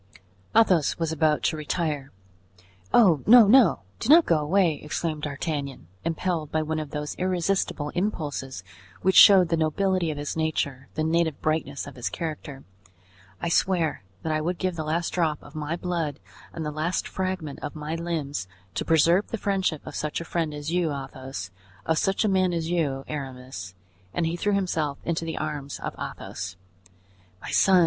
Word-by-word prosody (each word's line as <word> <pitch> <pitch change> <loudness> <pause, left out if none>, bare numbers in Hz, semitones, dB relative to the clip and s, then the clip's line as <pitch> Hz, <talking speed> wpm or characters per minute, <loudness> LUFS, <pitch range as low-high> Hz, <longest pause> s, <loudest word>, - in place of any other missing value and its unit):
Athos 185 -9 +4
was 165 -1 -1
about 155 -1 +2
to 160 - +1
retire. 150 -2 -2 0.8
"Oh! 175 - +5
no! 235 0 +9
no! 230 -5 +6 0.2
do 225 - -3
not 330 +3 +8
go 165 -2 +3
away!" 160 0 +2
exclaimed 155 0 -3
D'Artagnan, 145 - -4 0.2
impelled 165 -1 -2
by 155 0 +1
one 155 0 -2
of 155 -2 -5
those 150 0 -4
irresistible 180 -4 0
impulses 145 - -3 0.4
which 190 0 +3
showed 190 -4 +9
the 165 - +2
nobility 175 +2 +1
of 150 - -3
his 145 0 -3
nature, 140 -4 -1
the 155 - 0
native 160 -1 +1
brightness 155 -3 -1
of 140 -2 -10
his 125 - -2
character; 150 -4 -5 0.8
"I 170 - -2
swear 170 -2 +1 0.2
that 160 - -1
I 155 - 0
would 175 +3 -1
give 185 -2 -1
the 160 - -3
last 160 +2 -1
drop 160 -4 +1
of 145 - -14
my 155 +1 -3
blood 170 -5 -2 0.3
and 160 - -5
the 150 - -2
last 155 +4 -1
fragment 185 -6 -3
of 145 - -6
my 150 +1 -4
limbs 160 - -3 0.3
to - - -2
preserve 165 +4 +4
the 230 - -3
friendship 190 -7 -1
of - - -8
such 150 -1 -2
a 170 - -6
friend 165 -2 -1
as 150 +1 -5
you, 175 -2 +1
Athos—of 130 - -5
such 195 +3 +1
a - - +3
man 185 -2 +2
as 165 0 -2
you, 145 -6 0
Aramis." 130 -9 -6 0.4
And 170 - +1
he 165 +1 -1
threw 205 +4 0
himself 160 -7 -1
into 165 0 -1
the 160 - -4
arms 145 -2 -4
of - - -4
Athos. 90 - -6 0.8
"My - - -7
son!" 190 -1 +5
160 Hz, 175 wpm, -26 LUFS, 145-175 Hz, 0.8 s, no